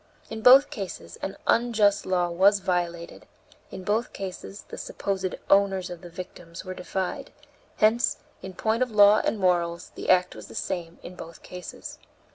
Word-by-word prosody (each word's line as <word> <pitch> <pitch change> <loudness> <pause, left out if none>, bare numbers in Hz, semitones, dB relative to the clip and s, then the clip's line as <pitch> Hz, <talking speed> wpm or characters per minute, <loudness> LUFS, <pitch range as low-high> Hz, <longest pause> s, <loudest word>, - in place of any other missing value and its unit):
In 220 0 -5
both 265 +5 +7
cases 195 -5 -7
an 195 - -5
unjust 215 -4 +2
law 180 -2 +1
was 195 +4 +5
violated; 175 -3 -3 0.4
in 185 - -8
both 215 +5 -1
cases 195 +1 -7
the - - -8
supposed 190 -2 -3
owners 195 -2 +3
of 175 - -8
the 175 - -10
victims 175 0 -9
were 185 - -5
defied; 185 +7 -4 0.4
hence, 220 +3 +3 0.2
in 190 -1 -8
point 220 +4 0
of 255 - +2
law 210 -1 +6
and - - 0
morals, 175 -3 0
the - - -6
act 180 -1 +4
was - - -10
the - - -12
same 170 -2 -4
in 180 - -8
both 165 -2 -11
cases. 180 0 -9
190 Hz, 165 wpm, -26 LUFS, 180-205 Hz, 0.4 s, both